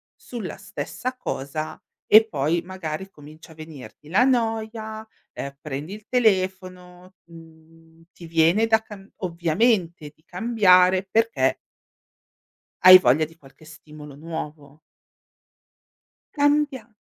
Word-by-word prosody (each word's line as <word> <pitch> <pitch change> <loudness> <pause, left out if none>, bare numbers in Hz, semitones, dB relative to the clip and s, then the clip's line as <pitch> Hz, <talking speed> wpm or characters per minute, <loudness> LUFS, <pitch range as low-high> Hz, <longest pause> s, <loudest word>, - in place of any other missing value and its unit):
sulla 240 -3 -8
stessa 255 +1 -6
cosa 155 - -5 0.2
e 220 +1 +6
poi 155 0 -1
magari 185 0 -7
comincia 155 0 -15
a - - -22
venirti 155 -1 -12
la 200 +8 +3
noia, 220 -3 -2 0.2
ehm, 140 0 -8
prendi 150 +5 -6
il 210 -1 -14
telefono, 185 -5 -2
mhmm, 165 0 -18
ti 170 - -12
viene 165 +7 +2
da 220 0 +4
cam 200 -3 -13
ovviamente 170 -2 0
di 155 - -34
cambiare 185 -2 +3
perché 200 - +1 1.2
Hai 185 0 +11
voglia 145 +2 +2
di 160 +2 -17
qualche 140 +2 -19
stimolo 150 -2 -13
nuovo. 150 -2 -8 1.6
Cambia 285 -6 0
180 Hz, 110 wpm, -23 LUFS, 155-220 Hz, 1.6 s, Hai